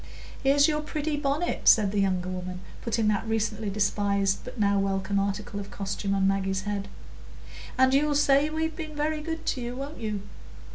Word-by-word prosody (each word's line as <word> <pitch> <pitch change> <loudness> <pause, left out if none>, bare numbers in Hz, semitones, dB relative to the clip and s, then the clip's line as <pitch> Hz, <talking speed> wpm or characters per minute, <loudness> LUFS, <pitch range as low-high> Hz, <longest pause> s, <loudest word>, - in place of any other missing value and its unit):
"Here's 280 +2 +5
your 300 -1 0
pretty 300 0 -2
bonnet," 290 +4 -1
said 210 -3 +6
the 205 - 0
younger 185 -2 0
woman, 185 0 -5 0.2
putting 225 -1 0
that 210 +1 0
recently 220 -1 -1
despised 200 -1 +1
but 250 -1 -9
now 200 -1 +3
welcome 195 0 0
article 200 +1 -2
of 200 0 -7
costume 200 0 -2
on 195 0 +2
Maggie's 195 -1 0
head; 200 -1 -3 0.9
"and 260 0 +5
you'll 290 +1 +3
say 280 +1 +4
we've 320 0 -2
been 310 -3 -6
very 305 +1 -1
good 325 +1 -5
to 255 - -1
you, 240 +1 -4
won't 280 +4 -6
you? 210 -3 -3
215 Hz, 180 wpm, -27 LUFS, 195-285 Hz, 0.9 s, said